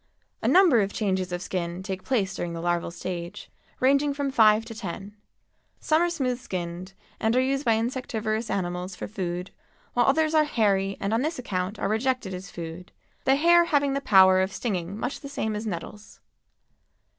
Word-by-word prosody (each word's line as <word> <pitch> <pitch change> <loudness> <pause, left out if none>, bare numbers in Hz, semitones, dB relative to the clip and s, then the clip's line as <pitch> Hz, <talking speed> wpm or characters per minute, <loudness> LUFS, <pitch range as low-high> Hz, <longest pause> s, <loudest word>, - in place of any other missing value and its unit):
A - - -1
number 350 - +6
of 200 0 -1
changes 190 -4 -1
of 175 0 -3
skin 175 0 -3
take 190 -1 -5
place 205 -7 0
during 175 -2 -4
the 165 - -5
larval 175 0 -1
stage, 170 0 -6 0.3
ranging 280 +2 +3
from 280 -1 -1
five 220 -2 +5
to 230 - -8
ten. 200 -1 -7 0.6
Some 310 +1 +2
are 345 - +2
smooth 255 -7 -1
skinned 180 -3 -5 0.3
and 220 +2 +1
are - - +4
used 270 +2 0
by 230 -2 +4
insectivorous 225 -2 -2
animals 180 0 -3
for - - -6
food, 180 -3 -4 0.4
while 245 -1 +3
others 310 +3 +3
are 310 -1 +5
hairy 195 -7 +1
and 200 +2 -1
on 225 - +2
this 315 +3 -2
account 190 -4 -3
are - - -1
rejected 225 -1 -1
as 185 +1 -7
food, 170 +1 -8 0.3
the 270 0 +5
hair 340 +4 +5
having 285 -4 +2
the 275 - -1
power 190 -5 +6
of 190 +1 -1
stinging 195 -4 -3
much 245 +4 -3
the 280 - -9
same 220 -6 -2
as 215 +2 -4
nettles. 205 +3 -7
215 Hz, 185 wpm, -26 LUFS, 185-260 Hz, 0.6 s, number